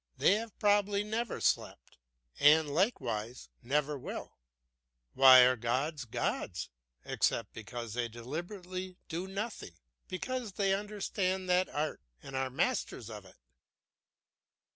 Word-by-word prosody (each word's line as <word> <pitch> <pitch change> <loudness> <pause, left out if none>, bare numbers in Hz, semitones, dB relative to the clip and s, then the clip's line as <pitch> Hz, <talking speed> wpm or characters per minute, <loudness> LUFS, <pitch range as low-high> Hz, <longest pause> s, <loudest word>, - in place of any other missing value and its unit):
They - - +5
have 220 0 -3
probably 205 0 +3
never 220 +2 -2
slept, - - -1 0.4
and 150 0 +5
likewise 125 - -1
never 145 +3 0
lived. - - -6 0.8
Why 130 -1 +9
are 125 +1 +5
gods 130 +5 -1
gods, 110 - -3 0.3
except 115 -3 0
because 115 0 -6
they 120 0 -1
deliberately 180 - -6
do 175 +3 -3
nothing; 200 - -5 0.3
because 240 +3 -4
they 195 0 +2
understand 195 -2 -2
that 180 +1 +3
art 150 +1 -2 0.2
and 135 - -8
are 130 0 0
masters 130 - -1
of 105 -2 -8
it? 95 - -17
155 Hz, 120 wpm, -32 LUFS, 125-195 Hz, 0.8 s, Why